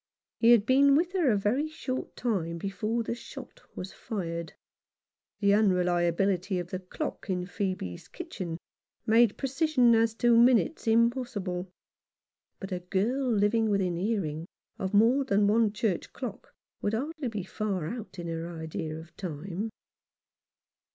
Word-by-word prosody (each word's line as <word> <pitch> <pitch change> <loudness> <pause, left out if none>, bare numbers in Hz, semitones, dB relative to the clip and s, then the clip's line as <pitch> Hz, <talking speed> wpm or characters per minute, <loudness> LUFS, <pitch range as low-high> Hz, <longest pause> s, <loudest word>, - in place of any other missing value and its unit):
He 230 - +5
had 235 -4 +6
been 275 +3 +5
with 340 +4 +2
her 350 -8 +3
a 210 - +3
very 240 +10 +1
short 275 -4 -5
time 180 -9 -1
before 210 +6 -2
the 225 - -2
shot 370 - -10
was 185 - -6
fired. 170 -6 -4 0.9
The 200 0 +4
unreliability 180 -1 +2
of 175 0 -4
the 185 - -2
dock 185 +2 -6
in 180 -1 -1
Phoebe's 185 - -4
kitchen 190 - -6 0.5
made 225 -1 +4
precision 270 -3 +3
as 225 0 +3
to 240 0 +4
minutes 235 -5 +4
impossible; 225 -6 +1 0.9
but 195 0 -7
a 180 - -1
girl 220 +9 0
living 220 +1 +2
within 190 -4 +1
hearing 175 -5 -2 0.3
of 190 +1 -2
more 235 +7 +5
than 205 -5 +2
one 215 +1 +3
church 210 -4 -1
clock 250 -1 -7 0.3
would 205 +2 0
hardly 295 +3 -3
be 215 -5 -3
far 195 -3 -3
out 220 0 -7
in 175 - -5
her 165 0 -4
idea 160 -1 -5
of 160 +1 -12
time. 185 +4 -4
205 Hz, 145 wpm, -29 LUFS, 180-235 Hz, 0.9 s, had